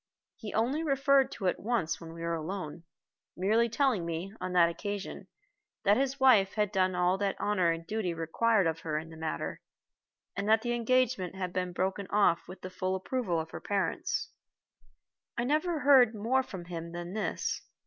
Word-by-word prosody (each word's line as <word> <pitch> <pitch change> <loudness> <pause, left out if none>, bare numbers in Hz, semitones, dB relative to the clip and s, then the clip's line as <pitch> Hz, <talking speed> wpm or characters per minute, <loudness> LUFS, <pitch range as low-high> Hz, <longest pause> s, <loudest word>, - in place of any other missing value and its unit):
He 215 -3 -7
only 255 +8 +1
referred 275 -2 +3
to 195 - -6
it 180 - +1
once 215 -8 -1
when 165 -1 -8
we 165 0 -8
were 170 0 -1
alone, 165 -1 -5 0.5
merely 220 +6 +2
telling 245 -6 +1
me, 170 +4 -4
on 185 0 -3
that 175 -2 +6
occasion, 200 +4 -5 0.6
that 205 +1 +5
his 270 +2 0
wife 220 -8 +5
had 210 -2 +1
done 185 -2 +1
all 180 +1 +2
that 200 -1 0
honor 185 -5 +2
and 165 0 -2
duty 215 -2 -2
required 185 +6 +1
of 165 0 0
her 155 -2 -2
in 160 +1 -6
the - - -10
matter, 160 -1 -4 0.7
and 200 +1 -2
that 220 0 +4
the 240 -1 0
engagement 240 -6 +1
had 185 -2 -4
been 180 -1 -1
broken 190 +2 -2
off 195 -5 +2
with 185 0 -10
the 185 - -7
full 185 0 -1
approval 190 -3 -1
of 160 0 -5
her - - -7
parents. 195 -5 -1 1.1
I 235 - +1
never 305 +4 0
heard 260 -6 +6
more 235 +6 +2
from 190 -9 -8
him 170 -1 -6
than 175 +1 -6
this. 215 - -2
195 Hz, 185 wpm, -30 LUFS, 175-230 Hz, 1.1 s, that